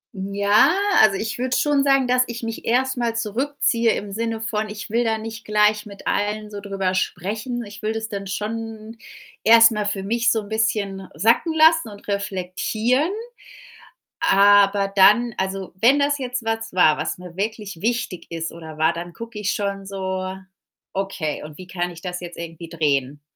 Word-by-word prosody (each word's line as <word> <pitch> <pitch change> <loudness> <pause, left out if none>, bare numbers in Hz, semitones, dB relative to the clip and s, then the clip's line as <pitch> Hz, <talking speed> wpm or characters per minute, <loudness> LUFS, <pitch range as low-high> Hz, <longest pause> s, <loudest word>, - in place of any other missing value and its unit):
Ja, 200 +7 +3 0.3
also, 205 -3 +5
ich 220 +3 -4
würde 255 0 0
schon 290 -2 +2
sagen, 275 -2 +3
dass 250 0 +3
ich 235 0 -6
mich 225 0 -5
erst 260 +2 +1
mal 235 -2 -1
zurückziehe 235 +1 0
im 200 -1 -5
Sinne 225 +1 -3
von: 215 -1 -2
„Ich 210 0 -8
will 235 +1 +2
da 225 -1 0
nicht 225 +1 -7
gleich 210 0 +2
mit 200 -1 -12
allen 210 +1 -1
so 205 - -6
drüber 195 -2 -2
sprechen.“ 220 +6 -2
Ich 205 +1 -11
will 215 +1 -1
das 220 0 -4
dann 200 -2 -5
schon 220 +2 -5 0.5
erst 225 +1 +8
mal 210 -1 -2
für 200 -2 -2
mich 235 +3 +1
so 220 - +1
'n 205 - -12
bisschen 210 -3 -1
sacken 230 - +3
lassen 320 -4 +5
und 205 0 -13
reflektieren. 205 - -1 1.1
Aber 200 -7 +4
dann 215 +4 +5
also, 190 -1 -3
wenn 265 +5 +6
das 285 0 +1
jetzt 250 -2 -3
was 225 0 -2
war, 155 -4 +5
was 155 - -3
mir 180 -1 -11
wirklich 205 -3 -4
wichtig 230 -5 -2
ist 165 -1 -4
oder 160 -2 -10
war, 160 +2 +3
dann 170 0 -7
gucke 230 -2 -8
ich 205 -1 0
schon 200 -1 -3
so: 190 -1 -3 0.6
„Okay, 190 -6 -3
und 150 0 -10
wie 185 - -9
kann 180 -1 -2
ich 170 -1 -11
das 180 -1 -4
jetzt 175 -1 -9
irgendwie 165 0 -8
drehen? 145 -3 -1
210 Hz, 180 wpm, -22 LUFS, 190-230 Hz, 1.1 s, erst